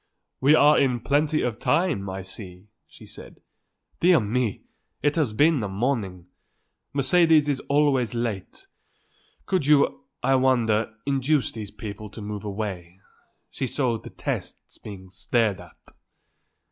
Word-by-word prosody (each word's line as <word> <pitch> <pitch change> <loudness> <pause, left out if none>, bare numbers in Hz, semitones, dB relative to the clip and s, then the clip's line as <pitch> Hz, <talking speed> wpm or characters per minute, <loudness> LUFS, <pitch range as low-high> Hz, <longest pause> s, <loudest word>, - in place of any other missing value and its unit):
"We 145 +4 +5
are 150 0 +5
in 125 -3 +1
plenty 150 +4 +1
of 120 -3 -2
time, 155 - 0
I 95 0 -5
see," 95 0 -10 0.2
she - - -15
said. - - -12 0.6
"Dear 175 -2 +5
me! 115 0 -2 0.4
it 145 0 +2
has 150 -9 +1
been 145 +5 +3
a 105 - -2
morning! 95 -4 -2 0.7
Mercedes 155 +2 +4
is 140 -2 0
always 140 -5 +2
late. 115 -5 -4 0.8
Could 180 -7 0
you, 140 -1 +3 0.2
I 135 +2 +3
wonder, 115 -4 +2
induce 140 +1 +1
these 110 -3 -7
people 105 0 -8
to 110 - -10
move 105 -1 -6
away. 95 -4 -5 0.5
She 130 - -3
so 125 -4 -1
detests - - -6
being 95 -3 -10
stared 110 -1 0
at." - - -16
120 Hz, 135 wpm, -25 LUFS, 105-145 Hz, 0.8 s, We